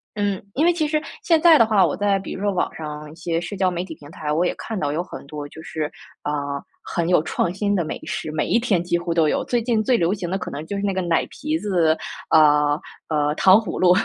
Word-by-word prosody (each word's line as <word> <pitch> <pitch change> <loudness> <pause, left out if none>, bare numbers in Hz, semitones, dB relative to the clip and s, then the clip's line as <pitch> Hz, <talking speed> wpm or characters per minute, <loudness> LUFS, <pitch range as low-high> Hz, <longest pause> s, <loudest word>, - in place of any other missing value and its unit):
嗯， 205 -2 0
因 295 - +1
为 345 - +5
其 315 -3 0
实 305 0 0 0.2
现 330 -2 +3
在 330 -2 +8
的 230 - +6
话， 210 -4 +4
我 160 - +1
在 200 -1 +2
比 - - -6
如 190 - -7
说 205 - +1
网 180 - 0
上 150 -1 -7
一 - - -13
些 165 0 -2
社 180 +3 -5
交 185 -1 +1
媒 175 +1 -2
体 - - -8
平 145 +1 -14
台， 150 -2 -4
我 165 +4 +2
也 - - 0
看 225 -3 -4
到 145 -3 -1
有 155 +4 -1
很 180 - -9
多 145 0 -7
就 160 - -12
是 155 -2 -4 0.3
呃， 150 - -1 0.5
很 170 0 -2
有 175 -3 +4
创 170 - -1
新 205 +2 -1
的 175 - +1
美 - - -5
食， 155 - -4
每 155 - -1
一 235 - +2
天 200 -8 +1
几 175 0 0
乎 175 0 -2
都 165 -2 +3
有。 - - 0
最 240 - 0
近 225 -2 +1
最 245 +1 +3
流 170 +3 +2
行 185 -4 -4
的， 190 - 0
可 - - -6
能 145 - -5
就 200 - -3
是 200 - -3
那 200 -1 +1
个 190 - -1
奶 170 -2 +1
皮 310 +2 -2
子 170 - +2 0.3
呃， 150 -1 +5 0.3
呃， 150 -1 +1
糖 190 0 +6
葫 220 - -3
芦。 180 -1 +5
180 Hz, 290 characters per minute, -22 LUFS, 155-205 Hz, 0.5 s, 在